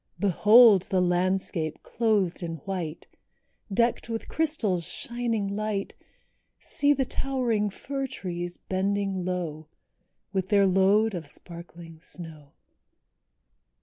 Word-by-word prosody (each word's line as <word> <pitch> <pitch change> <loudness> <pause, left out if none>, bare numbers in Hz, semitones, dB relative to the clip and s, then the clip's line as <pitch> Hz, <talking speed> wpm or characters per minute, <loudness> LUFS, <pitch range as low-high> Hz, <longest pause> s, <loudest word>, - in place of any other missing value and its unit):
Behold 205 +1 +6
the 190 - +2
landscape 180 -2 0
clothed 210 -6 0
in 165 -1 -4
white, 175 -5 -4 0.7
Decked 235 +3 +1
with 225 -1 -4
crystals' 240 - 0
shining 230 -4 -2
light; 210 -2 -2 0.6
See 290 0 0
the 275 -2 +2
towering 245 -7 -1
fir 270 +6 -4
trees 175 -7 -5
bending 195 0 -1
low, 165 -4 -3 0.7
With 190 -1 -1
their 200 -1 +5
load 195 +3 +3
of 165 -5 -5
sparkling 170 +1 -10
snow. 160 -5 -9
195 Hz, 105 wpm, -27 LUFS, 175-220 Hz, 0.7 s, Behold